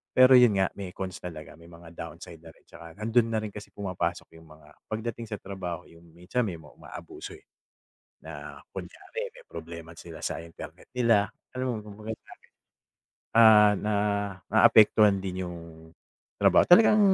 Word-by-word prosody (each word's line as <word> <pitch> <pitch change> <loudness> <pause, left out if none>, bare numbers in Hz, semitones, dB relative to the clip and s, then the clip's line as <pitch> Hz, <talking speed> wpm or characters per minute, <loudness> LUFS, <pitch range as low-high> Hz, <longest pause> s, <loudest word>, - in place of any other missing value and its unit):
Pero 130 +1 +7
yun 115 -5 +5
nga, 95 - +3
may 95 -3 -6
cons 95 -2 -6
talaga, 80 -5 -9
may 85 - -16
mga 85 0 -14
downside 85 +1 -9
na 80 - -12
rin - - -27
tsaka 85 -1 -13
nandun 115 +2 +1
na 110 - 0
rin 105 - -5
kasi 105 - -10
pumapasok 95 -4 -4
yung 80 - -18
mga 75 -1 -17 0.2
pagdating 115 +1 -5
sa 105 - -3
trabaho. 90 -4 -6
Yung 85 0 -19
minsan 90 +8 -2
may 85 -3 -5
mga 75 - -16
umaabuso, 370 +2 -10
eh, 400 - -25 0.8
na - - -9
kunyari - - -7
may - - -15
problema 85 0 -9
sila 80 -1 -11
sa - - -3
internet 85 0 -12
nila. 115 -4 +3 0.3
Alam 125 -3 -2
mo, - - -7
kumbaga 105 +1 -8
sa'kin, - - -19 0.9
ah, 105 -2 +8 0.8
naaapektuhan 105 -1 +6
din 95 -1 -4
yung 85 -1 -7 0.8
trabaho. - - +5
Talagang 215 +3 +7
100 Hz, 160 wpm, -27 LUFS, 85-115 Hz, 0.9 s, ah